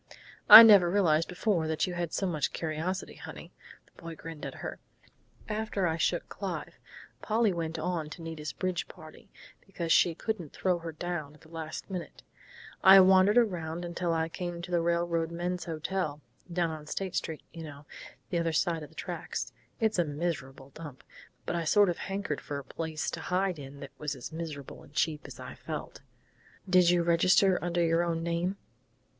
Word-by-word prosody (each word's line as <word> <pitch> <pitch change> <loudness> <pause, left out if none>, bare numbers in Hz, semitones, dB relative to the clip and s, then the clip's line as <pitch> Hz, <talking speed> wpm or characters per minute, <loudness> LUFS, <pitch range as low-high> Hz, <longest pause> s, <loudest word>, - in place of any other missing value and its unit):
"I 230 - +15
never 200 -6 +8
realized 165 -4 +3
before 180 -3 0
you 160 +3 -1
had 175 -2 -3
so 195 - -1
much 160 -5 -1
curiosity, 165 +4 -3
honey," - - -10 0.3
the - - -20
boy 165 -1 -7
grinned 165 -1 -7
at - - -8
her. - - -5 0.7
"After 210 -3 -1
I 165 -1 0
shook - - 0
Clive - - -6 0.4
Polly 220 -2 +2
went 165 -1 -3
on 160 -1 -2
to 165 +2 -9
Nita's 160 -2 -5
bridge 185 -2 -2
party, 155 -3 -14 0.3
because 170 -4 -4
she 170 0 +5
couldn't 180 -6 -4
throw 180 -2 0
her 165 -1 -6
down 155 -2 -5
at - - -21
the 160 - -18
last 160 -1 -6
minute 180 -3 -7 0.6
I 190 +1 +10
wandered 190 +3 +6
around 175 -6 0
till 175 -1 0
I 160 0 0
came 175 0 -5
to 180 - -7
the 175 -1 +2
Railroad 170 -1 0
Men's 175 +1 -3
Hotel, 160 -1 -3 0.3
down 170 -1 0
on 155 -1 -8
State 190 +3 -4
Street, 160 -2 -3
you 165 - -8
know, 145 -2 -10 0.5
the 175 - +1
other 165 -1 0
side 165 +1 +1
of 150 - -9
the - - -22
tracks. - - -5 0.3
It's 220 -5 +1
a - - +5
miserable 145 -4 -4
dump, 145 -3 -10 0.4
but - - -2
I 170 - -1
sort 205 +4 +4
of 170 - -7
hankered 195 -6 -3
for 145 - -5
a 140 - -6
place 160 +2 -4
to - - -5
hide 185 -2 -1
in 140 0 -10
that 140 - -8
was 150 -1 -3
as 130 - -8
miserable 155 -4 -7
and - - -17
cheap 150 0 -1
as - - -11
I - - -8
felt - - -7 0.3
" - - -29
"Did 180 -2 +5
you 175 -1 +3
register 180 +3 +4
under 175 0 +1
your 165 +1 +2
own 165 -1 -1
name?" 170 +3 -1
170 Hz, 185 wpm, -29 LUFS, 160-180 Hz, 0.7 s, I